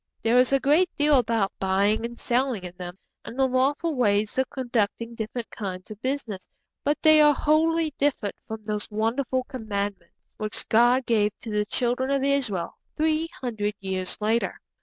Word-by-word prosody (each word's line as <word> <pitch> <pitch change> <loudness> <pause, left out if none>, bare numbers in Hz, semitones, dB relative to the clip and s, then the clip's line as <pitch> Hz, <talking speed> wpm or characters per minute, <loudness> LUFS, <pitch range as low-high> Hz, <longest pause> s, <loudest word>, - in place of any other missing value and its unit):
There 230 +2 +4
is 250 +1 +4
a 275 - +4
great 310 +7 +3
deal 295 -2 +5
about 225 -4 0
buying 200 +3 +2
and 235 0 -7
selling 250 -4 0
in 180 -1 -7
them, 180 0 -8 0.3
and 240 - -9
the 265 -1 +3
lawful 275 +6 +1
way 210 -6 +3
of 260 0 +1
conducting 235 -2 -2
different 230 +1 -5
kinds 185 -2 -6
of 215 0 -9
business; 255 -8 -3 0.3
but 290 +1 +1
they 310 -1 +7
are 295 -1 +6
wholly 315 +1 +2
different 275 -8 0
from 220 -1 -6
those 210 -1 -3
wonderful 235 +4 0
Commandments 205 -7 -5
which 215 0 -5
God 240 +3 +4
gave 210 -3 +1
to 225 - -6
the 210 0 +1
Children 250 +3 0
of 275 -1 +1
Israel 250 -11 -1 0.2
three 315 +1 +1
hundred 210 -4 -2
years 190 -1 -3
later. 220 +2 0
235 Hz, 170 wpm, -25 LUFS, 210-275 Hz, 0.3 s, they